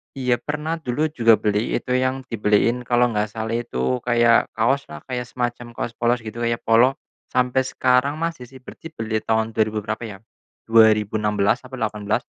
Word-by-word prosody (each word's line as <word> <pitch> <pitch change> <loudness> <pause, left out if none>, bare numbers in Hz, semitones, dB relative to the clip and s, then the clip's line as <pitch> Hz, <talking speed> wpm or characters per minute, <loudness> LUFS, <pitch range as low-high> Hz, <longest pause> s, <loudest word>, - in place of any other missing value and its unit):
Iya, 125 -2 0
pernah 155 +2 -3
dulu 155 +2 -1
juga 115 -6 +5
beli 105 +1 -1
itu 125 - -4
yang 130 +1 0
dibeliin, 115 +3 +1
kalau 120 0 +3
enggak 105 -1 0
salah 110 0 -3
itu 65 - -2
kayak 120 -1 +4
kaos 135 +5 +1
lah, 75 -1 -10
kayak 125 -1 -3
semacam 120 -1 -4
kaos - - -3
polos 120 +1 +1
gitu 110 +1 -7
kayak 115 0 -1
polo, 120 +4 +4 0.3
sampai 125 +1 +1
sekarang 130 +3 +2
masih 165 -6 -4
sih. 130 +1 -14
Berarti 165 - -10
beli 110 -1 -2
tahun 110 0 0
2000 110 -1 0
berapa 110 +2 -4
ya? 100 -3 -9 0.5
2016 105 -1 +3
apa 130 0 -9
18, 105 -2 -1
120 Hz, 170 wpm, -22 LUFS, 110-125 Hz, 0.5 s, juga